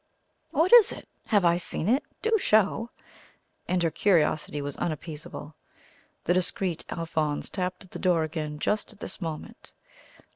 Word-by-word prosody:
"What 340 +8 +2
is 470 -4 +9
it? - - -9 0.2
Have 205 -5 +3
I 170 0 +4
seen 175 0 -2
it? 255 +6 +3 0.2
Do 450 0 +3
show!" 215 - +2 0.8
and 180 -1 +1
her 165 - +2
curiosity 155 -4 +2
was 145 0 -4
unappeasable. 155 -1 -5 0.7
The 175 - +2
discreet 180 -1 0
Alphonse 155 -3 -2
tapped 185 0 -3
at 185 - -17
the - - -7
door 175 -3 +2
again 155 -1 -4
just 210 +9 -1
at 205 - -22
this - - -4
moment. 160 -3 -7
175 Hz, 150 wpm, -27 LUFS, 155-205 Hz, 0.8 s, is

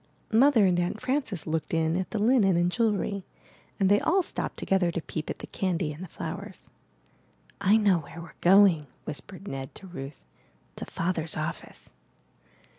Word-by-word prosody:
Mother 235 -1 +5
and 180 -2 +3
Aunt 175 +4 -1
Frances 255 - -2
looked 160 0 -2
in 160 0 +1
at 185 0 -2
the 225 - -3
linen 210 -4 +4
and 175 +1 +2
jewelry, 205 -3 0 0.6
and 195 - +3
they 205 +1 +5
all 370 +3 +2
stopped - - -3
together 190 -2 +1
to 170 - -2
peep 155 -1 -5
at - - -3
the - - -8
candy 175 -5 -2
and 160 +5 -9
the - - -7
flowers. - - -8 0.9
*'I 200 +3 +5
know 200 -5 +3
where 165 +2 -11
weVe 165 -2 -12
going/' 180 -5 +5 0.2
whispered 185 +6 -8
Ned 135 -1 -6
to - - -9
Ruth. 145 -6 -9 0.5
'To - - -5
Father's 165 -2 -2
office.'' 155 +1 -6
185 Hz, 170 wpm, -27 LUFS, 165-205 Hz, 0.9 s, Mother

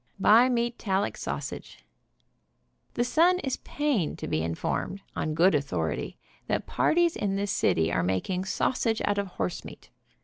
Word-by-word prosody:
BI 230 +6 +6
MEATALLIC 235 -5 0
SAUSAGE. - - -6 1.1
The 240 - +2
Sun 340 +8 +4
is 265 -2 -1
pained 280 - -1
to - - -6
be 80 - 0
informed, 85 - -3
on 155 -1 -2
good 170 +1 +4
author 90 - -1
ity, - - -5 0.3
that - - -1
parties 340 0 +2
in 195 -2 -1
this 200 0 -1
city 80 -3 +2
are - - +2
making 95 - -1
sausage 225 +3 0
out 205 0 +1
of 200 - -2
horsemeat. 180 - -5
200 Hz, 145 wpm, -27 LUFS, 150-240 Hz, 1.1 s, BI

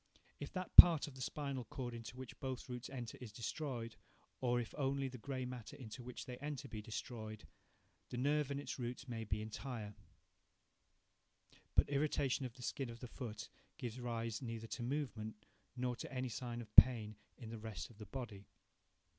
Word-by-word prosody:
If 145 - -5
that 185 -1 -4
part 165 -4 +13
of 145 - -8
the 130 - -9
spinal 140 -1 -2
cord 125 0 -4
into 115 +1 -7
which 130 -2 -8
both 130 -1 -3
roots 125 0 -5
enter 120 -4 -6
is 120 -4 -7
destroyed; 120 0 -3 0.4
or 120 -1 +2
if 115 - -4
only 140 -1 +1
the 125 -1 -8
grey 130 +1 -3
matter 125 -3 -6
into 125 0 -7
which 125 0 -6
they 125 -1 -6
enter 145 0 -4
be 110 -3 -5
destroyed, 110 -1 -5 0.6
the 125 - -4
nerve 145 +2 +2
and 140 0 -1
its 145 - -5
roots 125 +2 -4
may 115 -2 -3
be 105 +1 -1
entire; 110 -1 -5 1.8
but - - +6
irritation 140 -2 +1
of 120 - -14
the 125 - -10
skin 135 0 -2
of 115 0 -8
the 125 - -6
foot 115 -3 -6 0.3
gives 120 -1 -4
rise 115 -2 -2
neither 115 -2 -4
to 115 - -5
movement, 120 -5 -3 0.3
nor 125 -1 0
to - - -6
any 130 -1 -1
sign 120 0 -4
of 110 -2 -12
pain 110 -4 +9 0.2
in 115 -2 -8
the 115 - -5
rest 110 0 -5
of 110 - -18
the 105 - -8
body. 105 -4 -6
125 Hz, 185 wpm, -39 LUFS, 115-135 Hz, 1.8 s, part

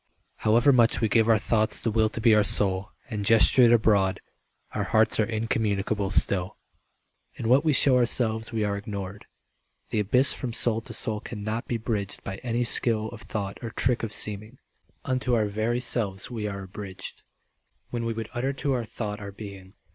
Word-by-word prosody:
However 120 +6 +3
much 120 -2 +3
we 115 - +1
give 110 +1 +2
our 110 - +5
thoughts 110 +1 0
the 115 - -1
will 110 0 +2
To - - -7
be 115 0 +4
our 105 -1 +4
soul 95 -1 +4 0.2
and 105 -2 -3
gesture 115 +4 +6
it 120 -1 +6
abroad, 105 -4 +3 0.5
Our - - -2
hearts 110 +1 +2
are 110 - +1
incommunicable 105 -3 -1
still. 95 -2 -1 0.8
In 115 - -4
what 130 +5 +4
we 155 - +2
show 135 -1 +5
ourselves 110 -2 0
we 110 -2 -1
are 100 -1 -1
ignored. 100 -1 -7 0.6
The - - 0
abyss 125 +6 +3
from 125 -3 -5
soul 115 -1 +1
to 115 - -10
soul 110 -1 -2
cannot 110 +1 -5
be 120 - -1
bridged 110 -3 -4
By 95 0 -6
any 120 +1 -2
skill 110 -2 0
of 115 -1 -11
thought 100 -4 -5
or 115 - -5
trick 120 +2 0
of 115 - -4
seeming. 105 +4 -3 0.5
Unto 130 -1 0
our 110 -2 +1
very 110 +4 -1
selves 105 -4 -1
we 110 -3 -4
are 100 -1 -6
abridged 95 0 -8 0.7
When 120 -1 -3
we 115 0 -2
would 110 -1 -6
utter 130 +3 -2
to 140 0 -2
our 120 -3 -2
thought 105 -1 -5
our 100 -1 -8
being. 100 -1 -11
110 Hz, 190 wpm, -26 LUFS, 105-120 Hz, 0.8 s, gesture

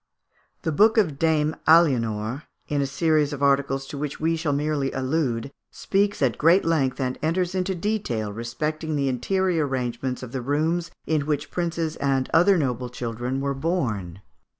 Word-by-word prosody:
The 165 - 0
book 215 +8 +4
of 155 -10 +2
Dame 155 -1 +2
Aliénor, 125 -6 +3 0.2
in 145 -1 0
a 140 - 0
series 155 0 +1
of 140 -1 -4
articles 135 -1 +2
to 140 +1 -7
which 150 -1 -4
we 165 +1 +1
shall 160 -2 -1
merely 145 -1 0
allude, 130 -2 -1 0.2
speaks 200 -4 0
at 125 -3 +1
great 170 +5 +5
length 140 -6 +1
and 130 -1 -2
enters 175 +3 0
into 190 0 -1
detail 165 - -2
respecting 150 +8 -3
the 140 -1 0
interior 175 +4 0
arrangements 125 -1 -3
of 125 - -8
the 130 - -3
rooms 160 +6 0 0.2
in 150 -2 0
which 145 -1 -2
princes 170 -2 -2
and 135 -2 0
other 185 +4 +5
noble 125 -5 -1
children 125 +2 -3
were 140 0 -1
born. 115 - -2
145 Hz, 165 wpm, -24 LUFS, 130-165 Hz, 0.2 s, great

